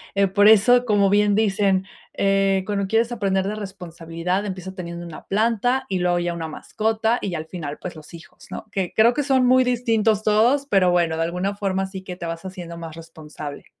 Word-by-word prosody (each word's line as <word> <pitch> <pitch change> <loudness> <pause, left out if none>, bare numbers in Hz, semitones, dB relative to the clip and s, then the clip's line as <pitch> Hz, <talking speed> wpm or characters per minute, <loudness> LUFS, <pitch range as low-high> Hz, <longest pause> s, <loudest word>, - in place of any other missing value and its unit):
eh, 200 0 +3
por 205 +2 +4
eso, 245 +4 +6
como 205 -3 +3
bien 205 0 +3
dicen, 200 -3 +1 0.3
eh, 195 -1 +2
cuando 200 -2 -2
quieres 225 +3 +1
aprender 195 -5 0
de 210 - -3
responsabilidad 180 -2 -4
empieza 190 -1 -6
teniendo 175 -2 -7
una 165 -2 -10
planta 230 +5 +1
y 190 -2 -2
luego 175 0 +1
ya 175 0 -2
una 165 -1 -5
mascota 220 +8 -1
y 185 -4 -3
al 155 -1 -4
final, 155 -4 -6
pues 180 - -7
los 155 +2 -13
hijos, 170 +3 -14
¿no?, - - -7
que 190 -3 -2
creo 230 +2 +5
que 295 - -1
son 265 -2 +2
muy 255 +1 +5
distintos 225 -4 +1
todos, 235 +7 +3
pero 195 -7 +3
bueno, 170 -2 +1
de 165 - 0
alguna 180 +4 -2
forma 195 -1 -1
sí 190 0 -8
que 180 -1 -7
te 175 - -7
vas 165 +1 -5
haciendo 175 -3 -8
más 165 -2 -8
responsable. 155 -3 -9
195 Hz, 205 wpm, -22 LUFS, 175-215 Hz, 0.3 s, eso